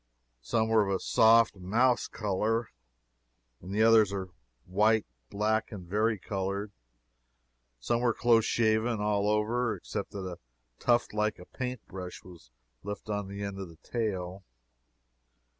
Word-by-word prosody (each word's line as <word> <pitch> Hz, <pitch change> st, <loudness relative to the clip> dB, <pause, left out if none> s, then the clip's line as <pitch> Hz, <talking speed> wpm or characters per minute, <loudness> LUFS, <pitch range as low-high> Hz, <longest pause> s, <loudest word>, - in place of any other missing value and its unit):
Some 110 Hz, -, 0 dB
were 110 Hz, -1 st, +4 dB
of 100 Hz, -, 0 dB
a -, -, -2 dB
soft 115 Hz, 0 st, +5 dB
mouse 115 Hz, +7 st, +2 dB
color, 110 Hz, +2 st, -1 dB, 0.9 s
and 90 Hz, -, -9 dB
the 105 Hz, +2 st, +2 dB
others 110 Hz, -3 st, +6 dB
were 95 Hz, -2 st, -4 dB, 0.4 s
white, 105 Hz, +4 st, +3 dB, 0.2 s
black, 110 Hz, +2 st, 0 dB
and 95 Hz, -5 st, -8 dB
vari 110 Hz, +4 st, +1 dB
colored. 100 Hz, +2 st, -3 dB, 1.1 s
Some 115 Hz, -, 0 dB
were 120 Hz, -1 st, +3 dB
close 115 Hz, -1 st, +3 dB
shaven, 110 Hz, 0 st, +1 dB
all 105 Hz, 0 st, +1 dB
over, 115 Hz, +3 st, +1 dB
except -, -, -5 dB
that 100 Hz, -2 st, -5 dB
a 90 Hz, -2 st, -6 dB, 0.4 s
tuft 120 Hz, -2 st, +2 dB
like 105 Hz, 0 st, 0 dB
a 90 Hz, -, -12 dB
paint 125 Hz, 0 st, -5 dB
brush 90 Hz, -1 st, -8 dB
was 85 Hz, -9 st, -14 dB, 0.3 s
left 105 Hz, +1 st, -6 dB
on 105 Hz, -1 st, -2 dB
the 100 Hz, +1 st, -6 dB
end 100 Hz, -1 st, -5 dB
of 95 Hz, -3 st, -6 dB
the 80 Hz, -, -15 dB
tail. 95 Hz, -5 st, -3 dB
105 Hz, 145 wpm, -29 LUFS, 95-115 Hz, 1.1 s, others